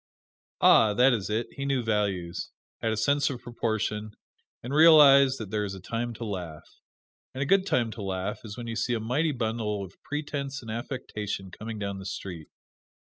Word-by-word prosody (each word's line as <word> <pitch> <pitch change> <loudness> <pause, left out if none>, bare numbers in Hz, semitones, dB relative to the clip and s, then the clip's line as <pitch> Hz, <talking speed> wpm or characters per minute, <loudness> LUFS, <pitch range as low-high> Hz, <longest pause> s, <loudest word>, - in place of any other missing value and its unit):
Ah! 105 -2 +6
that 125 +3 +5
is 105 -4 -2
it 110 +3 0
he 140 - -6
knew 135 -3 0
values 100 -6 -1 0.3
had 115 - 0
a 110 - -1
sense 140 +5 +2
of 130 -3 -5
proportion, 110 -2 -2 0.5
and 125 +3 -5
realized 145 -4 +7
that 105 -4 -7
there 105 -1 0
is 100 -1 -4
a - - -9
time 115 +5 -3
to 115 - -6
laugh. 90 -7 -6 0.7
And 135 - -1
a - - -2
good 195 +5 +3
time 120 - +1
to 110 - -8
laugh 95 +1 -3
is 110 0 -8
when 120 - -6
you 115 -1 -4
see 120 +2 0
a - - -1
mighty 135 +9 0
bundle 110 -5 -2
of 90 - -10
pretense 145 -2 -4
and 110 - -6
affectation 105 -5 -5
coming 110 +3 -7
down 100 -1 -4
the 95 - -9
street. 90 -5 -6
115 Hz, 190 wpm, -27 LUFS, 105-130 Hz, 0.7 s, realized